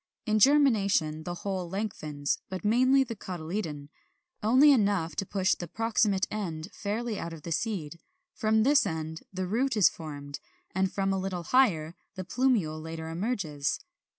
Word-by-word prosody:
In 215 Hz, -1 st, +2 dB
germination 200 Hz, -, +3 dB
the 175 Hz, -, -3 dB
whole 185 Hz, -1 st, -4 dB
lengthens 155 Hz, -8 st, -3 dB
(but 185 Hz, -1 st, -5 dB
mainly 255 Hz, +5 st, +4 dB
the 235 Hz, -3 st, -6 dB
cotyledon) 165 Hz, -5 st, -5 dB, 0.5 s
only 260 Hz, +7 st, +6 dB
enough 200 Hz, -, +2 dB
to 195 Hz, -, -2 dB
push 190 Hz, -2 st, +2 dB
the 175 Hz, -, -5 dB
proximate 215 Hz, -1 st, +1 dB
end 175 Hz, -5 st, -4 dB
fairly 220 Hz, +1 st, -3 dB
out 170 Hz, -, -5 dB
of 155 Hz, -3 st, -10 dB
the 170 Hz, -, -6 dB
seed; 170 Hz, -4 st, -2 dB, 0.3 s
from 220 Hz, 0 st, +2 dB
this 270 Hz, -2 st, +4 dB
end 160 Hz, -2 st, -4 dB
the 185 Hz, -1 st, -3 dB
root 235 Hz, +6 st, 0 dB
is 200 Hz, -, +6 dB
formed, 145 Hz, -3 st, -8 dB, 0.3 s
and 190 Hz, 0 st, +1 dB
from 195 Hz, -1 st, 0 dB
a 190 Hz, -, 0 dB
little 185 Hz, -2 st, -3 dB
higher 170 Hz, -11 st, +2 dB, 0.2 s
the 185 Hz, -, -4 dB
plumule 195 Hz, -9 st, +1 dB
later 160 Hz, 0 st, -6 dB
emerges. 165 Hz, -, -2 dB
190 Hz, 155 wpm, -28 LUFS, 160-220 Hz, 0.5 s, only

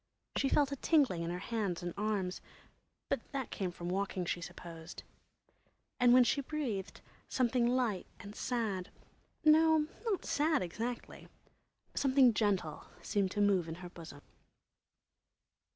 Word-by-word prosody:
She 275 Hz, -, +2 dB
felt 285 Hz, 0 st, +3 dB
a -, -, -1 dB
tingling 265 Hz, -, +3 dB
in 170 Hz, -, -2 dB
her 175 Hz, -, -2 dB
hands 195 Hz, -3 st, -2 dB
and 175 Hz, -1 st, -3 dB
arms, 200 Hz, -3 st, -1 dB, 0.7 s
but -, -, -3 dB
that 270 Hz, -3 st, -3 dB
came 190 Hz, -2 st, -2 dB
from 175 Hz, 0 st, -7 dB
walking, 190 Hz, 0 st, -1 dB
she 175 Hz, -, -2 dB
supposed. 165 Hz, -1 st, -9 dB, 1.0 s
And 245 Hz, -1 st, +6 dB
when 250 Hz, 0 st, +8 dB
she 280 Hz, +3 st, +1 dB
breathed, 255 Hz, -10 st, -4 dB, 0.3 s
something 245 Hz, -1 st, +2 dB
light 240 Hz, -6 st, 0 dB
and 205 Hz, +1 st, -9 dB
sad—no, 300 Hz, -, +1 dB, 0.2 s
not 435 Hz, -5 st, -1 dB
sad, 300 Hz, -, +2 dB
exactly—something 245 Hz, +4 st, -1 dB
gentle 195 Hz, -8 st, 0 dB, 0.2 s
seemed 200 Hz, -2 st, +1 dB
to 205 Hz, -, -1 dB
move 195 Hz, -4 st, +3 dB
in 160 Hz, -, -4 dB
her 175 Hz, +1 st, -9 dB
bosom. 160 Hz, -4 st, -11 dB
210 Hz, 130 wpm, -33 LUFS, 180-260 Hz, 1.0 s, when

